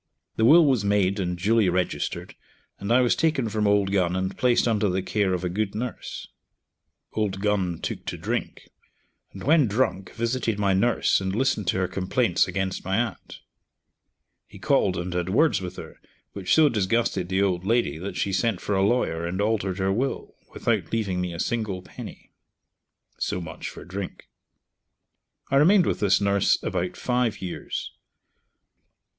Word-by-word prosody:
The 110 Hz, -, +2 dB
will 160 Hz, +6 st, +7 dB
was 130 Hz, -7 st, +2 dB
made 100 Hz, -1 st, +1 dB
and 90 Hz, -2 st, -2 dB
duly 105 Hz, +2 st, +3 dB
registered, 90 Hz, 0 st, -2 dB, 0.5 s
and 100 Hz, +3 st, -3 dB
I 125 Hz, +2 st, +5 dB
was 125 Hz, -, +3 dB
taken 155 Hz, -8 st, +1 dB
from 105 Hz, -1 st, 0 dB
Old 100 Hz, -1 st, +2 dB
Gun 90 Hz, -3 st, +1 dB
and 95 Hz, +1 st, -2 dB
placed 125 Hz, -1 st, +2 dB
under 105 Hz, -3 st, +1 dB
the 95 Hz, +1 st, -1 dB
care 100 Hz, -1 st, 0 dB
of 90 Hz, -, -5 dB
a -, -, 0 dB
good 100 Hz, +2 st, -2 dB
nurse. 120 Hz, +2 st, -5 dB, 0.9 s
Old 105 Hz, -3 st, -1 dB
Gun 95 Hz, -4 st, 0 dB
took -, -, -5 dB
to -, -, -3 dB
drink, -, -, -4 dB, 0.6 s
and 95 Hz, -, -10 dB
when 150 Hz, -1 st, +4 dB
drunk 100 Hz, -4 st, -1 dB
visited 115 Hz, -2 st, -1 dB
my 100 Hz, -2 st, +2 dB
nurse, 105 Hz, +1 st, +2 dB
and 95 Hz, 0 st, -2 dB
listened 115 Hz, -5 st, 0 dB
to -, -, +1 dB
her 95 Hz, 0 st, +1 dB
complaints 95 Hz, +1 st, +1 dB
against 95 Hz, -1 st, -3 dB
my 95 Hz, +2 st, -1 dB
aunt. 115 Hz, -4 st, -4 dB, 1.1 s
He -, -, -14 dB
called 95 Hz, -, +1 dB
and 90 Hz, +1 st, -4 dB
had 90 Hz, 0 st, -2 dB
words 150 Hz, +4 st, +3 dB
with 90 Hz, 0 st, -6 dB
her, -, -, -10 dB, 0.3 s
which 95 Hz, -2 st, +1 dB
so 160 Hz, -1 st, +6 dB
disgusted 105 Hz, -4 st, 0 dB
the 95 Hz, +1 st, +2 dB
old 90 Hz, -3 st, 0 dB
lady 105 Hz, -7 st, +1 dB
that 95 Hz, +3 st, -5 dB
she 100 Hz, -, -1 dB
sent 100 Hz, 0 st, +1 dB
for 105 Hz, -, -3 dB
a 95 Hz, -, +2 dB
lawyer 95 Hz, -6 st, +1 dB
and 90 Hz, +2 st, -3 dB
altered 100 Hz, -3 st, 0 dB
her 95 Hz, 0 st, +1 dB
will, 130 Hz, +6 st, -2 dB, 0.2 s
without -, -, -1 dB
leaving 100 Hz, -5 st, -1 dB
me 90 Hz, -1 st, -2 dB
a 85 Hz, -, -7 dB
single 105 Hz, -4 st, -2 dB
penny. -, -, -11 dB, 0.9 s
(So -, -, -1 dB
much 85 Hz, -, -7 dB
for -, -, -11 dB
drink.) 95 Hz, +1 st, -7 dB, 1.2 s
I 135 Hz, -, +4 dB
remained 175 Hz, +6 st, +5 dB
with -, -, -1 dB
this 100 Hz, -2 st, +3 dB
nurse 100 Hz, -1 st, +2 dB
about 90 Hz, +1 st, -2 dB
five 125 Hz, -3 st, 0 dB
years. 90 Hz, -2 st, -5 dB
100 Hz, 170 wpm, -25 LUFS, 95-115 Hz, 1.2 s, will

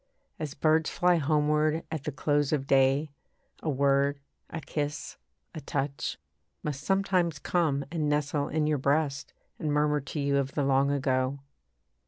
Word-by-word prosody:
As 150 Hz, -2 st, -4 dB
birds 160 Hz, 0 st, +2 dB
fly 180 Hz, 0 st, +3 dB
homeward 150 Hz, +1 st, +2 dB
at 155 Hz, -4 st, -4 dB
the 150 Hz, -, -1 dB
close 145 Hz, +1 st, +1 dB
of 145 Hz, -3 st, 0 dB
day, 135 Hz, +2 st, +3 dB, 0.5 s
A 160 Hz, -, -2 dB
word, 140 Hz, 0 st, +2 dB, 0.3 s
a 165 Hz, -, -5 dB
kiss, 150 Hz, 0 st, -4 dB, 0.4 s
a 160 Hz, -, -6 dB
touch, 140 Hz, 0 st, -3 dB, 0.5 s
Must 145 Hz, -2 st, -3 dB
sometimes 185 Hz, -3 st, +1 dB
come 150 Hz, -4 st, 0 dB
and 155 Hz, -3 st, 0 dB
nestle 145 Hz, -1 st, 0 dB
in 155 Hz, 0 st, 0 dB
your 150 Hz, -2 st, +1 dB
breast 140 Hz, 0 st, 0 dB, 0.2 s
And 155 Hz, -, -1 dB
murmur 150 Hz, 0 st, +2 dB
to 140 Hz, +3 st, -5 dB
you 140 Hz, 0 st, +1 dB
of 140 Hz, 0 st, -1 dB
the 145 Hz, -, 0 dB
long 135 Hz, 0 st, +3 dB
ago. 135 Hz, -1 st, 0 dB
145 Hz, 155 wpm, -28 LUFS, 140-155 Hz, 0.5 s, fly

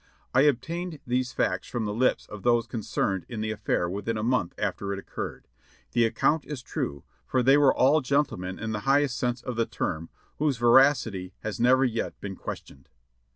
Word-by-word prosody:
I 130 Hz, -, +5 dB
obtained 155 Hz, +5 st, 0 dB
these 125 Hz, +1 st, 0 dB
facts -, -, -1 dB
from 120 Hz, -3 st, -3 dB
the 105 Hz, -, -2 dB
lips 125 Hz, +4 st, +1 dB
of 105 Hz, -1 st, -9 dB
those 120 Hz, 0 st, +3 dB
concerned 100 Hz, -4 st, -2 dB
in 115 Hz, -3 st, -4 dB
the 110 Hz, 0 st, -1 dB
affair 105 Hz, -4 st, -1 dB
within 100 Hz, +5 st, -3 dB
a 105 Hz, -, -2 dB
month 120 Hz, -7 st, 0 dB
after 100 Hz, 0 st, -2 dB
it 100 Hz, -, -2 dB
occurred; 100 Hz, -, -7 dB, 0.4 s
the 120 Hz, -1 st, +3 dB
account 145 Hz, +7 st, +1 dB
is 135 Hz, -2 st, -7 dB
true, 70 Hz, -, -4 dB, 0.2 s
for 130 Hz, -1 st, 0 dB
they 135 Hz, +3 st, +6 dB
were 145 Hz, -2 st, +6 dB
all 145 Hz, +4 st, +4 dB
gentlemen 125 Hz, -10 st, -1 dB
in 110 Hz, 0 st, -4 dB
the 105 Hz, -, -2 dB
highest 140 Hz, -2 st, +3 dB
sense 125 Hz, 0 st, -2 dB
of 125 Hz, -2 st, -4 dB
the 115 Hz, -, +1 dB
term, 80 Hz, +1 st, -3 dB, 0.3 s
whose 145 Hz, -4 st, +1 dB
ver 120 Hz, +2 st, +7 dB
acity 105 Hz, -10 st, 0 dB
has 110 Hz, +1 st, -4 dB
never 130 Hz, +3 st, +5 dB
yet 115 Hz, -2 st, -2 dB
been 100 Hz, -1 st, -6 dB
questioned. 70 Hz, -5 st, -8 dB
120 Hz, 195 wpm, -27 LUFS, 105-130 Hz, 0.4 s, ver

